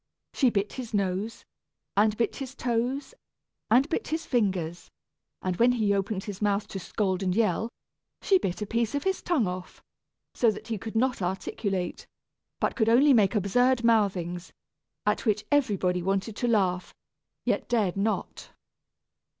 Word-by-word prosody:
She 260 Hz, -, +3 dB
bit 205 Hz, -2 st, -1 dB
his 240 Hz, -4 st, -5 dB
nose, 200 Hz, +3 st, -2 dB, 0.5 s
and 210 Hz, +1 st, +3 dB
bit 235 Hz, -, 0 dB
his 270 Hz, -1 st, -6 dB
toes, 250 Hz, -, -1 dB, 0.6 s
and 255 Hz, +5 st, +5 dB
bit 320 Hz, -, -2 dB
his 320 Hz, +1 st, -2 dB
fingers; 185 Hz, -8 st, -1 dB, 0.5 s
and 185 Hz, -1 st, -1 dB
when 245 Hz, +1 st, +5 dB
he 215 Hz, -4 st, +2 dB
opened 195 Hz, 0 st, -1 dB
his 205 Hz, -2 st, -7 dB
mouth 205 Hz, 0 st, +1 dB
to 195 Hz, -, -5 dB
scold 190 Hz, 0 st, -1 dB
and 185 Hz, -1 st, 0 dB
yell, 225 Hz, +1 st, +1 dB, 0.5 s
she 385 Hz, -2 st, +3 dB
bit 190 Hz, -, -2 dB
a -, -, -3 dB
piece 230 Hz, +3 st, -1 dB
of 285 Hz, -, -1 dB
his 385 Hz, 0 st, 0 dB
tongue 325 Hz, -10 st, +1 dB
off, 180 Hz, 0 st, -6 dB, 0.5 s
so 235 Hz, -, +3 dB
that 215 Hz, +2 st, -5 dB
he 220 Hz, -3 st, -2 dB
could 225 Hz, +2 st, -7 dB
not 250 Hz, -1 st, +1 dB
articulate, 190 Hz, +1 st, -3 dB, 0.5 s
but -, -, 0 dB
could 220 Hz, -2 st, +2 dB
only 270 Hz, +5 st, +6 dB
make 215 Hz, -3 st, +4 dB
absurd 245 Hz, +5 st, +2 dB
mouthings, 185 Hz, -6 st, +1 dB, 0.5 s
at -, -, 0 dB
which 210 Hz, 0 st, +1 dB
everybody 195 Hz, -10 st, +2 dB
wanted 195 Hz, +4 st, -1 dB
to 245 Hz, -, 0 dB
laugh, 185 Hz, -5 st, +1 dB, 0.5 s
yet -, -, 0 dB
dared 215 Hz, -7 st, +1 dB
not. 210 Hz, +2 st, -2 dB
215 Hz, 160 wpm, -27 LUFS, 190-240 Hz, 0.6 s, only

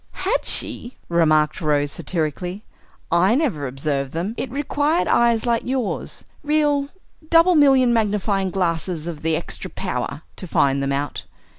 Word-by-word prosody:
"Had 445 Hz, +6 st, +1 dB
she!" 240 Hz, +2 st, +1 dB
remarked 155 Hz, -1 st, +2 dB
Rose, 145 Hz, -2 st, +1 dB
satirically. 175 Hz, +6 st, -3 dB, 0.5 s
"I 185 Hz, +6 st, +4 dB
never 225 Hz, -, 0 dB
observed 135 Hz, +1 st, -3 dB
them. 175 Hz, +7 st, -2 dB
It 260 Hz, -, -4 dB
required 290 Hz, +4 st, 0 dB
eyes 235 Hz, -1 st, +3 dB
like 235 Hz, -1 st, +1 dB
yours, 255 Hz, -4 st, -3 dB, 0.2 s
real 295 Hz, -2 st, +1 dB, 0.4 s
'double 335 Hz, +2 st, +5 dB
million 270 Hz, -5 st, +5 dB
magnifying 205 Hz, -3 st, 0 dB
glasses 170 Hz, -2 st, -2 dB
of 170 Hz, -3 st, -5 dB
h'extra 160 Hz, -1 st, -2 dB
power,' 145 Hz, +3 st, -4 dB
to 185 Hz, -, -7 dB
find 140 Hz, -3 st, +2 dB
them 140 Hz, 0 st, -1 dB
out. 140 Hz, -9 st, -3 dB
190 Hz, 135 wpm, -21 LUFS, 155-255 Hz, 0.5 s, double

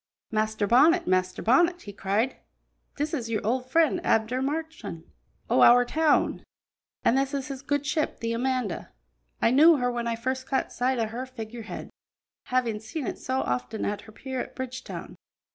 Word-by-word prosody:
"Master 215 Hz, -1 st, 0 dB
Bonnet! 300 Hz, -, +5 dB
Master 185 Hz, 0 st, 0 dB
Bonnet!" 345 Hz, +9 st, +3 dB
he 205 Hz, -, -8 dB
cried; 205 Hz, +6 st, 0 dB, 0.6 s
"this 295 Hz, +2 st, -2 dB
is 240 Hz, -7 st, -2 dB
your 215 Hz, -3 st, -2 dB
old 250 Hz, +3 st, -1 dB
friend, 330 Hz, +4 st, +3 dB
Abner 225 Hz, +4 st, +1 dB
Marchand, 310 Hz, -, -4 dB, 0.4 s
o' -, -, +3 dB
our 245 Hz, +1 st, +7 dB
town; 310 Hz, +3 st, +2 dB, 0.6 s
an' -, -, +5 dB
this 270 Hz, +1 st, +1 dB
is 275 Hz, +1 st, -3 dB
his 270 Hz, -1 st, -6 dB
good 285 Hz, +1 st, -1 dB
ship 300 Hz, +1 st, -1 dB
the 230 Hz, 0 st, -2 dB
Amanda. 250 Hz, -5 st, -2 dB, 0.5 s
I -, -, +5 dB
knew 315 Hz, +6 st, +7 dB
her 245 Hz, -1 st, 0 dB
when 235 Hz, -1 st, -3 dB
I 230 Hz, -, 0 dB
first 260 Hz, +3 st, -3 dB
caught 265 Hz, -, -1 dB
sight 255 Hz, +1 st, 0 dB
o' 230 Hz, -, +1 dB
her 240 Hz, +4 st, -5 dB
figure 235 Hz, -2 st, -7 dB
head, 220 Hz, -, -8 dB, 0.5 s
havin' 240 Hz, -4 st, 0 dB
seen 275 Hz, +7 st, -5 dB
it -, -, -4 dB
so 260 Hz, +1 st, -1 dB
often 125 Hz, -, -2 dB
at 205 Hz, 0 st, -2 dB
her 215 Hz, -, -14 dB
pier 260 Hz, +3 st, -5 dB
at -, -, -8 dB
Bridgetown. 260 Hz, 0 st, -6 dB
250 Hz, 180 wpm, -27 LUFS, 225-275 Hz, 0.6 s, our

